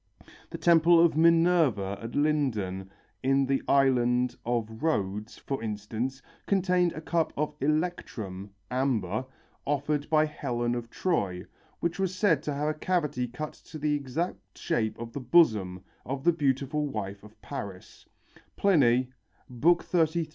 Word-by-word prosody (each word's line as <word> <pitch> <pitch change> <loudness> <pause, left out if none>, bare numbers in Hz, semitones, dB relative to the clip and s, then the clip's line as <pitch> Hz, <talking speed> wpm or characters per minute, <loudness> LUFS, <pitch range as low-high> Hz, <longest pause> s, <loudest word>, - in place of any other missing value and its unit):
The - - -6
temple 170 0 +5
of 170 -2 +4
Minerva 160 - +3
at 115 +1 -7
Lyndon 115 -11 0 0.3
in 135 +1 +2
the 135 0 0
island 125 -2 +3
of 110 -1 -2
Rhodes, 105 -7 -1
for 135 -4 -4
instance, 110 +5 -4 0.2
contained 180 -3 +2
a 155 - -7
cup 165 0 0
of 150 +1 -1
electrum 135 - -2 0.2
(amber) 125 -5 0 0.4
offered 145 +1 -1
by 155 -1 +4
Helen 120 -5 -2
of 120 -1 -4
Troy, 100 - -1 0.4
which 170 +2 -1
was 190 -1 -1
said 185 -4 +3
to 150 - -3
have 150 +2 0
a - - 0
cavity 150 -9 0
cut 135 +6 -6
to 155 - -12
the 150 0 0
exact 140 - -4
shape 110 -2 -1
of 115 0 -7
the - - -4
bosom 110 - +3 0.2
of 135 +1 -4
the 175 - +4
beautiful 145 0 0
wife 100 -7 -5
of 105 0 -16
Paris 95 -2 -8 0.5
(Pliny, 130 -10 +3 0.4
XXXIII, 170 +8 +3
23). 165 -1 +2
135 Hz, 140 wpm, -28 LUFS, 115-160 Hz, 0.5 s, temple